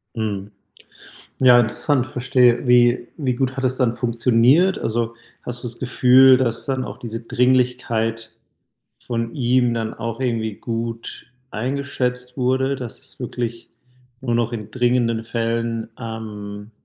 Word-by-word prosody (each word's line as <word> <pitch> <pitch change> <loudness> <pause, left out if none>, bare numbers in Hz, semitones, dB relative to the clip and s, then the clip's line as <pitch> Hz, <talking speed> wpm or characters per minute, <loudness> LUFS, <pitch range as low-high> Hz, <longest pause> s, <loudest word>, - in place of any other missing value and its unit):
Mhm. 105 -2 -3 0.9
Ja, 125 -2 +7
interessant, 130 +3 0
verstehe, 125 0 +2
wie 120 0 +4
wie 130 -6 -1
gut 130 +1 -1
hat 135 - -3
es 130 0 +1
dann 120 -3 +1
funktioniert? 125 +9 +3
Also 115 +1 -2 0.3
hast 125 +1 -7
du - - -2
das 115 - -13
Gefühl, 130 +1 +6
dass 120 -1 -1
dann 130 -2 -1
auch - - -8
diese 115 0 -6
Dringlichkeit 120 -2 0 0.7
von 115 -1 -3
ihm 125 -2 +2
dann 115 -1 -3
auch 115 +1 -5
irgendwie 115 -4 -1
gut 115 0 -5 0.2
eingeschätzt 125 0 -3
wurde, 130 +2 +1
dass 125 -4 -7
es - - -18
wirklich 120 -1 -5 0.5
nur 120 -3 -1
noch 120 0 0
in 110 -2 -6
dringenden 120 -2 +1
Fällen 115 0 -2
ähm, 105 -2 -7
120 Hz, 135 wpm, -21 LUFS, 115-125 Hz, 0.9 s, Ja